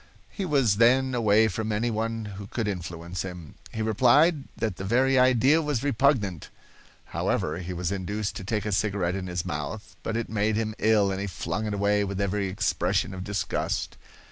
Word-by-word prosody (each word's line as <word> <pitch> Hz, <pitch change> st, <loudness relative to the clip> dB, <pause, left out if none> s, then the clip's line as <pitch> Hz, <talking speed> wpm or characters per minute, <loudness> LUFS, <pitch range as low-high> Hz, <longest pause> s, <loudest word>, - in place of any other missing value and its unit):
He 195 Hz, -, -4 dB
was 135 Hz, -, +2 dB
then 130 Hz, +3 st, +4 dB
away 110 Hz, -2 st, +4 dB
from 110 Hz, +2 st, -3 dB
any 115 Hz, +3 st, 0 dB
one 115 Hz, 0 st, -2 dB
who 100 Hz, 0 st, -8 dB
could 110 Hz, 0 st, -3 dB
influence 85 Hz, -2 st, -4 dB
him. 90 Hz, -5 st, -7 dB, 0.2 s
He 110 Hz, -, -3 dB
replied 135 Hz, -, +4 dB
that 110 Hz, -6 st, -2 dB
the 95 Hz, -, -5 dB
very 130 Hz, +6 st, +3 dB
idea 130 Hz, +5 st, +4 dB
was 150 Hz, -6 st, -1 dB
repugnant. 120 Hz, -, +1 dB, 0.6 s
However, -, -, -1 dB
he 90 Hz, 0 st, -5 dB
was 90 Hz, 0 st, -2 dB
induced 100 Hz, +2 st, -3 dB
to -, -, -7 dB
take 105 Hz, +1 st, -2 dB
a 105 Hz, -, -1 dB
cigarette 100 Hz, -3 st, 0 dB
in 95 Hz, -1 st, -4 dB
his 90 Hz, -1 st, -3 dB
mouth, 75 Hz, +9 st, -5 dB
but 115 Hz, -, -2 dB
it 115 Hz, -, -2 dB
made 110 Hz, 0 st, 0 dB
him 110 Hz, 0 st, -1 dB
ill 105 Hz, -2 st, +3 dB
and 95 Hz, 0 st, -3 dB
he 100 Hz, -, -2 dB
flung 90 Hz, +3 st, -3 dB
it 105 Hz, -, -2 dB
away 100 Hz, +1 st, +2 dB
with 100 Hz, -1 st, -4 dB
every 100 Hz, 0 st, 0 dB
expression 95 Hz, -1 st, 0 dB
of 90 Hz, -1 st, -6 dB
disgust. 105 Hz, 0 st, -2 dB
105 Hz, 190 wpm, -26 LUFS, 95-115 Hz, 0.6 s, then